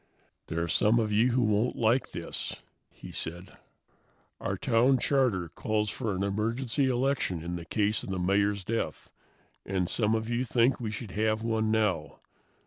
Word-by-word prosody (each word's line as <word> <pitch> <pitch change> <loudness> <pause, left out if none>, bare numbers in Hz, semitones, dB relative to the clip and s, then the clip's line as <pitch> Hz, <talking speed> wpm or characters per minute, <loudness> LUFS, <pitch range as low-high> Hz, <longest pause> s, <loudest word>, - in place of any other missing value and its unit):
"There 85 +1 -1
are - - -2
some 105 +7 +3
of 110 -2 0
you 115 +4 +4
who 125 0 +3
won't 110 +3 +1
like 115 +3 +2
this," - - -4 0.3
he - - -11
said. 85 +3 -4 0.8
"Our 95 0 -2
town 125 +4 +3
charter 120 - +1
calls 105 +5 -1
for 110 -6 -2
an 95 - -1
emergency 115 +7 0
election 125 - 0
in 85 0 -4
case 105 +4 0
of - - -7
the 95 - -2
Mayor's 100 +2 +1
death, 115 +4 -3 0.5
and 95 -2 -1
some 110 +2 +1
of 110 0 -2
you 120 +1 0
think 125 +1 +2
we 115 -3 -3
should 105 -1 -6
have 110 +2 0
one 110 -1 0
now. 105 -8 0
110 Hz, 165 wpm, -29 LUFS, 95-120 Hz, 0.8 s, you